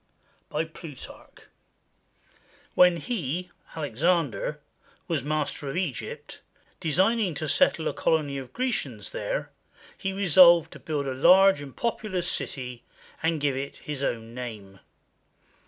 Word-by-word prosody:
] - - -38
BY 155 +2 -1
PLUTARCH 155 -4 -12 1.3
When 180 -1 +6
he 180 - -3 0.2
[Alexander] 150 0 0 0.5
was 160 -6 -1
master 150 -1 -2
of 135 - -4
Egypt, 165 -11 -4 0.4
designing 190 +3 +2
to 155 +2 -3
settle 165 - +3
a - - -1
colony 145 -4 0
of 130 -2 -9
Grecians 255 0 -2
there, - - -3 0.4
he 195 - -3
resolved 175 -3 +6
to - - -11
build 150 -3 -3
a 135 - -2
large 185 +5 +6
and 140 -2 -10
populous 210 -6 -2
city, 125 -7 -3 0.4
and 160 -1 +1
give 140 -2 0
it 135 +1 -4
his 145 -2 -5
own 115 -3 -3
name. 110 -6 -8
155 Hz, 125 wpm, -26 LUFS, 140-180 Hz, 1.3 s, When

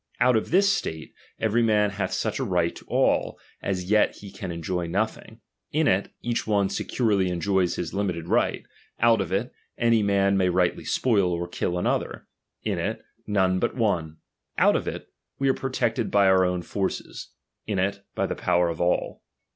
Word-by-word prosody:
Out 125 -1 +4
of 110 - 0
this 195 +5 +4
state, 80 -1 -4 0.3
every 115 +1 +2
man 105 -2 +3
hath 100 0 -3
such - - -2
a - - 0
right 85 -2 0
to - - -11
all, - - +1 0.2
as 95 -2 -2
yet 105 -1 +4
he 100 -1 -11
can 95 -3 -6
enjoy 85 +1 -3
nothing; 110 +4 -3 0.3
in 155 0 +2
it, 95 -2 +1
each 120 -1 -2
one 100 -2 +2
securely 100 -4 0
enjoys 90 +1 +1
his 85 - -4
limited 90 -4 -2
right. - - +1 0.4
Out 115 -2 +4
of 95 -2 -4
it, 100 +6 -1 0.2
any 115 -2 +3
man 100 -1 +2
may 95 -1 +2
rightly 90 0 +1
spoil 100 -8 +2
or 85 0 -2
kill 90 0 -2
another; 90 - -1 0.4
in - - -1
it, - - -3 0.2
none 95 -3 +2
but - - -1
one. 85 -10 0 0.4
Out - - +5
of - - -1
it, - - -5 0.3
we 135 - 0
are - - +4
protected 130 -4 -1
by 100 -1 +4
our 95 -1 +5
own 90 -1 -1
forces; 95 +1 -4 0.4
in 105 -2 -1
it, 100 +2 -1
by - - 0
the - - -2
power 85 -1 +1
of 85 0 -4
all. 90 0 0
100 Hz, 185 wpm, -25 LUFS, 90-110 Hz, 0.4 s, Out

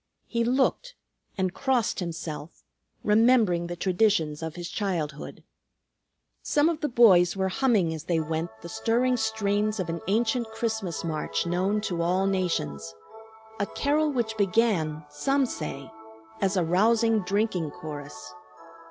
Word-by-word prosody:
He 235 -1 -1
looked, 270 - 0 0.4
and 185 -1 0
crossed 260 -4 0
himself, 165 -3 -6 0.4
remembering 210 -5 +3
the 175 - -5
traditions 175 -5 +1
of 160 -1 -5
his 175 -1 -5
childhood. 165 -9 -4 1.0
Some 295 +2 +2
of 330 -2 -2
the 300 - 0
boys 195 -7 +5
were 190 0 0
humming 200 -7 +2
as 160 0 -7
they 170 -2 +1
went 160 +1 -2
the - - -6
stirring 245 +7 +1
strains 215 -2 0
of 180 - -2
an 165 0 -3
ancient 230 +3 +1
Christmas 220 -6 -3
march 160 -1 -2
known 185 +5 0
to 175 -5 -2
all 180 +3 +1
nations; 85 - -2 0.6
a 200 - 0
carol 300 +5 +1
which 235 -4 -1
began, 185 -7 +1
some 270 - +1
say, 140 - -6 0.5
as 195 0 +1
a 180 - +3
rousing 225 +6 +3
drinking 195 -4 -1
chorus. 145 -4 -9
195 Hz, 135 wpm, -26 LUFS, 165-225 Hz, 1.0 s, boys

